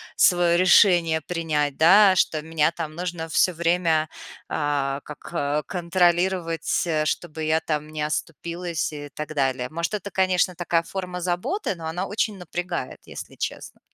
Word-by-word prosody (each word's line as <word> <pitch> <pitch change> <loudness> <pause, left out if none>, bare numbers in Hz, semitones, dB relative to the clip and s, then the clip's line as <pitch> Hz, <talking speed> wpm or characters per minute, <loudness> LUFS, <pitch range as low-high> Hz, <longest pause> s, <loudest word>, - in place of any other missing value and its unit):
своё 175 -2 +4
решение 175 -3 +5
принять, 150 -4 -1
да? 190 +4 +7
Что 155 -3 +1
меня 160 0 +1
там 160 -2 -6
нужно 175 -1 -4
всё 180 +3 +3
время, 165 -2 +1 0.4
а, 140 -2 -1
как 150 -1 -3
контролировать, 175 -1 +1
э, 155 -3 0
чтобы 160 0 -3
я 155 +1 +2
там 155 -1 -3
не 155 0 -5
оступилась 165 +3 -3
и 145 -1 -7
так 150 +2 -6
далее. 130 -3 0
Может, 170 +5 -3
это, 200 -1 -5
конечно, 185 -1 +1
такая 170 -1 0
форма 180 0 -5
заботы, 185 - -1
но 165 -2 -9
она 180 +4 -3
очень 215 -1 -1
напрягает, 175 -4 -5
если - - -9
честно. - - -5
170 Hz, 145 wpm, -24 LUFS, 155-180 Hz, 0.4 s, да